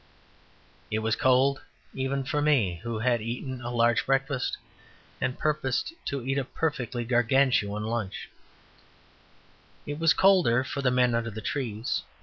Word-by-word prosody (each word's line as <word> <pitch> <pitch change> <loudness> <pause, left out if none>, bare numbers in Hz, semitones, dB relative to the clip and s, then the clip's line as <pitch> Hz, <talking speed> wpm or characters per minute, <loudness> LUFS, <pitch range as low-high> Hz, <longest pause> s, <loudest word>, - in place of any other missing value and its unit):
It 110 - -1
was 115 0 +2
cold 130 +1 +3 0.3
even 135 +1 -2
for 150 +2 -1
me, 120 - +2
who 115 -1 -4
had 120 0 +1
eaten 125 +3 -5
a 120 - -5
large 120 -1 +2
breakfast 135 0 0 0.6
and 130 0 -1
purposed 150 - -1
to 140 -3 -3
eat 135 +1 0
a - - -1
perfectly 125 -4 -2
Gargantuan 120 -3 +2
lunch; 110 -3 -3 1.6
it 145 +1 -5
was 165 +1 +5
colder 175 -11 +4
for 140 - -4
the 130 - +2
men 125 -1 +3
under 115 0 0
the 110 0 -7
trees. 115 -1 -2
125 Hz, 140 wpm, -27 LUFS, 115-140 Hz, 1.6 s, was